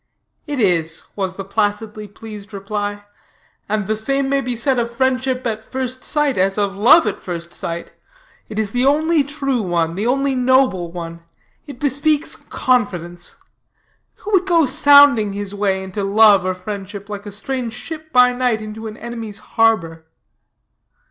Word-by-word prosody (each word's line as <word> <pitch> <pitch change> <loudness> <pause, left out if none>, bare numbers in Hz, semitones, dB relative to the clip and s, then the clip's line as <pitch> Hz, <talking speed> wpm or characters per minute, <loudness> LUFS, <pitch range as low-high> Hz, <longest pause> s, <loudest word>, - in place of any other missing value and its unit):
"It 290 -2 -3
is," 165 -6 +1
was 190 -2 -2
the 195 - -6
placidly 210 +1 -2
pleased 210 0 -10
reply: 205 +1 -4 0.6
"and 210 -1 0
the 215 +2 0
same 275 +5 0
may 275 0 +2
be 250 -2 -3
said 250 +2 +1
of 235 0 -1
friendship 260 +1 0
at 220 -2 -2
first 255 +1 -4
sight 295 -6 0
as 195 +2 +1
of 200 -1 0
love 235 +11 +6
at 205 -2 -2
first 170 -1 -6
sight: 170 0 -5 0.6
it 215 - -7
is 215 -2 -1
the 245 +2 0
only 305 +3 +3
true 275 -3 -2
one, 170 -4 0
the 205 +6 -2
only 275 +2 +1
noble 255 -9 +2
one. 170 -1 -7 0.5
It 280 -4 -9
bespeaks 290 +2 +1
confidence. 180 -9 -2 0.8
Who 425 - -8
would 380 -2 +3
go 335 -4 +4
sounding 285 -6 +6
his 205 0 -5
way 195 -2 0
into 190 +2 -4
love 200 -1 +5
or 185 - -1
friendship, 200 +1 -7
like 205 0 -7
a - - -6
strange 235 +3 -4
ship 315 +3 -8
by 250 -1 +5
night, 245 -3 0
into 215 +1 -7
an 215 0 -8
enemy's 230 -3 -6
harbor?" 165 -8 0
220 Hz, 160 wpm, -19 LUFS, 195-260 Hz, 0.8 s, love